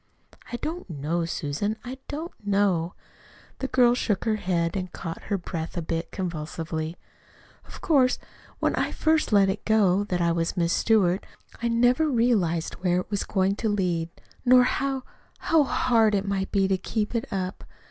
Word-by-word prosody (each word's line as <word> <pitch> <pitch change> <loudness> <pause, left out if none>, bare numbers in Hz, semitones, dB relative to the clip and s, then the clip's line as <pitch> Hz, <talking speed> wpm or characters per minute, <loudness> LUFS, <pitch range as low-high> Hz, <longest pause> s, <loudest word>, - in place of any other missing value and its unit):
"I - - -2
don't 325 - -5
know, 165 +2 -2
Susan, 165 +7 -2
I 260 +2 -6
don't 320 +4 -5
know." 195 -4 +1 0.6
The 265 - -2
girl 250 -2 +4
shook 220 -4 -1
her 220 -2 +1
head 170 -3 0
and 185 -2 -3
caught 165 0 -7
her 200 - 0
breath 170 -2 -5
a - - 0
bit 165 +1 -3
convulsively. 160 -2 -4 0.7
"Of - - -11
course, 265 -6 +3 0.4
when - - +1
I - - 0
first 315 -3 +1
let 200 -2 +5
it 195 +2 -2
go 205 -3 +3
that 180 -3 -1
I 170 -1 +2
was 165 +2 -1
'Miss 170 -1 +2
Stewart,' 195 -5 +2 0.3
I 235 - +1
never 245 +6 +3
realized 210 - +1
where 180 -1 +2
it - - -13
was 205 - 0
going 195 0 +1
to 225 - -1
lead, 175 -5 0 0.3
nor 250 0 +7
how 270 +1 -1 0.3
how 325 -2 +3
hard 225 -5 +3
it 200 0 -1
might 195 -1 -1
be 195 -1 +2
to 190 -1 +1
keep 215 +2 -2
it 235 +3 -2
up. 185 -1 -3
195 Hz, 175 wpm, -26 LUFS, 170-240 Hz, 0.7 s, nor